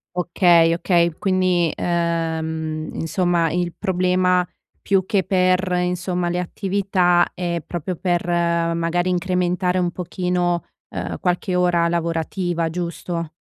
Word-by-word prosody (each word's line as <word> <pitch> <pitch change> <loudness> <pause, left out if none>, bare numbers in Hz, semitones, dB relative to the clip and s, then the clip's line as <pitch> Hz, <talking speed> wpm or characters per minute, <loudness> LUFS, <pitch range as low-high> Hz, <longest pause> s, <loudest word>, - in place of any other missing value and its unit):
Okay, 175 -2 +4
okay. 170 -1 +2
Quindi, 185 -3 +2
ehm, 160 -2 -2
insomma, 170 -1 0
il 175 0 -1
problema 180 -1 +1 0.3
più 190 -2 +1
che 200 -3 +1
per, 185 0 +2
insomma, 180 0 -1
le 175 +1 -1
attività 185 -1 +1
è 170 -2 -2
proprio 175 +1 -4
per 175 -1 0
magari 170 0 0
incrementare 180 0 0
un 175 -1 0
pochino, 180 0 -1 0.3
ehm, - - -5
qualche 180 +1 -1
ora 175 -1 +2
lavorativa, 170 0 -1
giusto? 170 -1 -4
175 Hz, 110 wpm, -21 LUFS, 170-180 Hz, 0.3 s, Okay